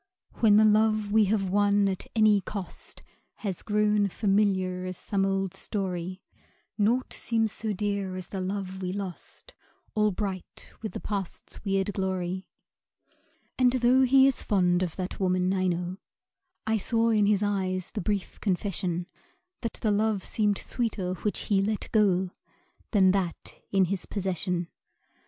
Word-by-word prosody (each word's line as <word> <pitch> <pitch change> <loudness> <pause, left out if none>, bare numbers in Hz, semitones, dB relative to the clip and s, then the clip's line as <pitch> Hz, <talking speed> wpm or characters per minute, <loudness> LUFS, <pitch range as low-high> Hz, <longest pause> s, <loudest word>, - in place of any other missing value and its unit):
When 210 -3 +6
the 215 - +6
love 215 -1 +3
we 215 0 +5
have 195 -2 0
won 205 0 +3
at 190 -1 -3
any 215 -2 +5
cost 195 -1 -8 0.4
Has 190 -3 -2
grown 210 -1 +2
familiar 195 -2 +1
as 185 -1 -5
some 195 -1 0
old 195 -1 -1
story, 185 -2 -3 0.5
Naught 230 +5 +1
seems 225 -2 0
so 220 +1 -3
dear 200 -2 -2
as 185 -1 -7
the 195 - -4
love 190 0 -4
we 180 -1 -2
lost, 200 - -7 0.4
All 210 0 +3
bright 190 -2 -5
with 220 - -5
the - - -4
Past's 200 -4 -5
weird 195 0 0
glory. 185 -1 -2 1.1
And 250 -1 +5
tho' 255 +1 +4
he 265 +1 +6
is 270 -2 +2
fond 180 -4 +2
of 175 -3 -2
that 185 -1 -5
woman, 185 -1 +1
I 185 -1 +1
know 175 +1 -2 0.7
I 220 0 +1
saw 230 +2 +1
in 210 -2 +3
his 210 -1 +3
eyes 185 -3 -1
the 215 - -3
brief 200 0 -2
confession 180 -3 -1 0.6
That 230 - -3
the 215 - +3
love 210 -1 +1
seemed 210 -2 +1
sweeter 210 -7 -2
which 205 +3 -2
he 200 -2 +2
let 210 +1 -2
go 190 -4 +3 0.6
Than 190 -4 +5
that 185 -3 -3
in 195 -1 +4
his 185 +1 -3
possession. 180 -3 -2
200 Hz, 150 wpm, -27 LUFS, 185-210 Hz, 1.1 s, When